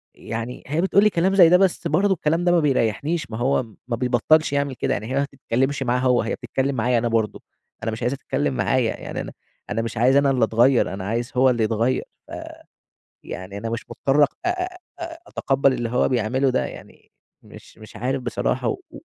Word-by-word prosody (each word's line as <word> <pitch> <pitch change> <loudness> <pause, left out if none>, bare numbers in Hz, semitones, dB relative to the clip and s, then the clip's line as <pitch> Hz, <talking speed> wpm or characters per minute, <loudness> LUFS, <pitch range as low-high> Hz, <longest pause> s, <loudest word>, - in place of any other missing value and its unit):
يعني 115 +2 -6
هي 155 +5 0
بتقول 195 +2 +4
لي 215 - +5
كلام 190 +1 +1
زي 175 -4 +8
ده 180 - +7
بس 190 -1 +1
برضه 200 0 +2
الكلام 165 0 0
ده 175 - +4
ما 175 - +4
بيريّحنيش، 145 - 0
ما 110 - -4
هو 130 +2 +1 0.2
ما 120 - -1
بيبطّلش 125 +6 +2
يعمل 140 -1 0
كده، - - -1
يعني 105 - -3
هي - - -1
ما 140 - +2
بتتكلّمش 135 0 -1
معاه 125 0 +1
هو، 125 -1 +3
هي 115 - -2
بتتكلّم 135 +3 -2
معايا 120 +1 +1
أنا 120 +1 0
برضه، 115 -2 -1 0.4
أنا 115 - -1
مش 110 - -6
عايزها 125 +3 0
تتكلّم 145 +1 -1
معايا، 130 -4 +1
يعني - - -5
أنا - - -7 0.4
أنا 115 - -1
مش 115 +1 -5
عايز 125 +4 +4
أنا 140 -1 +4
اللي 125 -4 +3
أتغيّر، 120 -2 +3
أنا 95 -1 -5
عايز 120 +4 -2
هو 130 +1 +5
اللي 120 -3 +1
يتغيّر، 115 +4 0 0.2
ف - - -15 0.9
يعني 95 +2 -7
أنا 115 +3 -4
مش 115 0 -4
مُضطر 135 +5 +2
أ - - +5 0.2
أ - - +3 0.5
أ 335 -1 -6
أتقبّل 135 0 +1
اللي 120 -2 -2
هو 125 +2 +1
بيعمله 130 +2 +1
ده، 130 - 0
يعني - - -12 0.3
مش - - -15
مش 110 0 -13
عارف 130 +4 -2
بصراحة 120 -3 -1
و - - -4
و - - -10
130 Hz, 215 wpm, -23 LUFS, 115-140 Hz, 0.9 s, زي